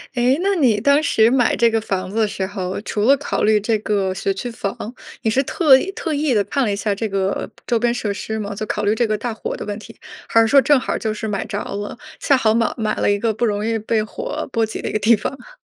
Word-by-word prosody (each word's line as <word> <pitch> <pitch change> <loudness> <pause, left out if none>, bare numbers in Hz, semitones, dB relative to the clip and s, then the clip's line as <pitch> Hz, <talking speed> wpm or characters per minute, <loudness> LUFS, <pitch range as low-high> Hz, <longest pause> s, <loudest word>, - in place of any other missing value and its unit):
诶， 250 +2 +3
那 400 +1 +2
你 255 - +3
当 280 +6 +4
时 225 -7 +3
买 250 -2 +3
这 235 0 +3
个 225 0 +1
房 190 -3 -2
子 215 - -5
的 220 -1 +3
时 195 -2 -3
候， 190 -1 -4
除 210 - -3
了 275 +3 +5
考 285 - -3
虑 215 0 +4
这 215 +1 0
个 200 -3 0
学 195 - -1
区 195 +5 -4
房， 200 -3 -4 0.5
你 220 - +1
是 265 - +3
特 280 0 +4
意 315 +9 0
特 385 -8 -3
意 290 -3 +1
地 205 - +3
看 270 +8 -1
了 215 - 0
一 - - 0
下 205 0 -1
这 215 +2 -3
个 195 0 -1 0.2
周 235 -2 +1
边 240 +1 +2
设 225 -4 -2
施 220 +2 -4
吗？ 205 -1 -4
就 200 - -5
考 210 - -2
虑 205 +1 +3
这 235 +1 +1
个 215 0 0
大 235 +2 -3
火 220 - -5
的 - - -6
问 205 -1 -4
题， 225 +1 -13 0.3
还 230 - +4
是 225 - +5
说 275 +4 +6
正 290 0 +4
好 - - -2
就 215 -1 -2
是 220 +1 -4
买 205 -2 -2
着 - - -4
了， 205 +3 -5 0.2
恰 275 - +3
好 220 -4 +2
买 230 -1 +1
买 215 -2 -1
了 - - +1
一 205 - +2
个 220 +2 0
不 215 - -4
容 210 -2 0
易 225 0 0
被 215 0 0
火 480 - -5
波 230 -2 +1
及 220 0 -4
的 - - -2
一 - - -6
个 215 - +1
地 225 +3 +5
方 210 - -4
啊？ - - -15
220 Hz, 305 characters per minute, -20 LUFS, 205-245 Hz, 0.5 s, 说